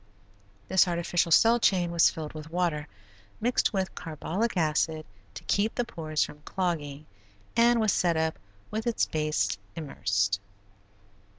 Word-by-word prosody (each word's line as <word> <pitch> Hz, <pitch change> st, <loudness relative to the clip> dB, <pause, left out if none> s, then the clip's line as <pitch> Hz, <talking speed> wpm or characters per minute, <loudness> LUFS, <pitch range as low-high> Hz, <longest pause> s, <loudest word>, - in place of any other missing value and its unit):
This 190 Hz, 0 st, +4 dB
artificial 170 Hz, 0 st, 0 dB
cell 230 Hz, +7 st, +6 dB
chain 180 Hz, -6 st, +2 dB
was 170 Hz, -1 st, +5 dB
filled 155 Hz, -2 st, -6 dB
with 155 Hz, 0 st, -8 dB
water, 165 Hz, -4 st, -1 dB, 0.5 s
mixed 245 Hz, +3 st, +1 dB
with 190 Hz, -2 st, -2 dB
carbolic 180 Hz, +7 st, -3 dB
acid 155 Hz, -1 st, +1 dB, 0.3 s
to -, -, -8 dB
keep 210 Hz, +2 st, +1 dB
the 245 Hz, -, 0 dB
pores 155 Hz, -7 st, -1 dB
from 150 Hz, -, -8 dB
clogging, 155 Hz, -5 st, -3 dB, 0.5 s
and 235 Hz, +1 st, +5 dB
was 215 Hz, -2 st, +2 dB
set 170 Hz, -2 st, +2 dB
up 160 Hz, 0 st, -1 dB, 0.3 s
with 220 Hz, +2 st, -3 dB
its 235 Hz, -, +2 dB
base 120 Hz, -, -1 dB, 0.2 s
immersed. 100 Hz, -10 st, 0 dB
170 Hz, 135 wpm, -28 LUFS, 155-195 Hz, 0.5 s, cell